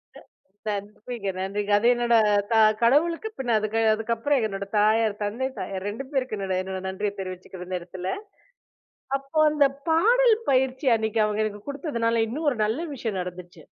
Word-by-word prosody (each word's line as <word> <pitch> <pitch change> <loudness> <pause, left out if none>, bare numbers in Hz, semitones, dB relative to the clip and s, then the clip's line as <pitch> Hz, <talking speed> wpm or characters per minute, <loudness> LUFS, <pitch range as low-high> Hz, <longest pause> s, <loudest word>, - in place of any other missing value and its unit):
அ - - -11 0.6
நன்றிங்க, 210 +1 -6
நன்றிங்க. 200 +2 -3
அது 230 - 0
என்னோட 240 -1 +1 0.4
த - - +4 0.3
கடவுளுக்கு 330 - +3
பின்ன 245 -3 -1
அதுக்கு 215 +1 -1
அதுக்கப்புறம் 230 +4 0
என்னோடய 200 -1 -5
தாயார், 215 0 +3
தந்தை, 235 +6 -2
தாயார் 195 0 -4
2 225 +6 -5
பேருக்கும் 255 -5 -1
என்னோட 190 -1 -2
என்னோட 190 0 -5
நன்றிய 200 +2 -2
தெரிவிச்சுக்கிரும் 185 -1 -7
இந்த 185 -1 -2
இடத்துல. 180 +1 -6 1.1
அப்போ 275 +3 -3
அந்த 290 -2 +4 0.2
பாடல் 455 +8 +5 0.2
பயிற்சி 260 +2 +1
அன்னைக்கு 220 0 0
அவங்க 215 +1 0
எனக்கு 205 -1 -6
குடுத்ததுனால 235 -6 0
இன்னும் 300 +5 -3
ஒரு 245 - -4
நல்ல 265 +11 -2
விஷயம் 220 -6 -3
நடந்துச்சு. 180 -2 -9
220 Hz, 155 wpm, -25 LUFS, 200-265 Hz, 1.1 s, பாடல்